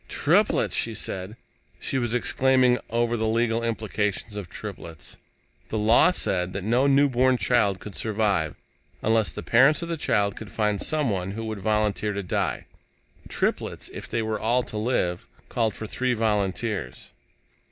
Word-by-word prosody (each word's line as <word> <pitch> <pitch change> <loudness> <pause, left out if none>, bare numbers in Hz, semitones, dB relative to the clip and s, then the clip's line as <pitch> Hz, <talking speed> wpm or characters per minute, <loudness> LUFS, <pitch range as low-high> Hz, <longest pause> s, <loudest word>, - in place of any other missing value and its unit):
"Triplets!" - - +2
she - - 0
said. 95 +4 -4 0.4
She 135 - -1
was 120 -1 0
exclaiming 130 0 +3
over 120 +1 +1
the 110 -1 -1
legal 115 +1 +1
implications 105 -2 -2
of 100 -5 -6
triplets. 85 -7 -8 0.5
The 110 - -2
law 110 +8 +5
said 90 - -1
that 95 - -4
no 120 +6 +2
newborn 130 -2 +4
child 105 -7 +2
could 105 +2 -9
survive 100 -8 0 0.5
unless 110 -1 +2
the - - -7
parents 135 +7 +4
of 170 - -5
the 165 - -2
child 100 -7 +1
could 110 - -8
find 105 -2 0
someone 100 -12 -1
who 115 +1 -5
would 110 -2 -4
volunteer 105 0 0
to 100 0 -3
die. 90 - -2 0.6
Triplets, - - -2
if - - -8
they 115 - -1
were 110 -1 -2
all 120 +3 +2
to 110 - -6
live, 100 -7 -1 0.2
called 115 -2 0
for 110 - -6
three 125 +3 -1
volunteers. 105 - -2
110 Hz, 155 wpm, -25 LUFS, 100-120 Hz, 0.6 s, law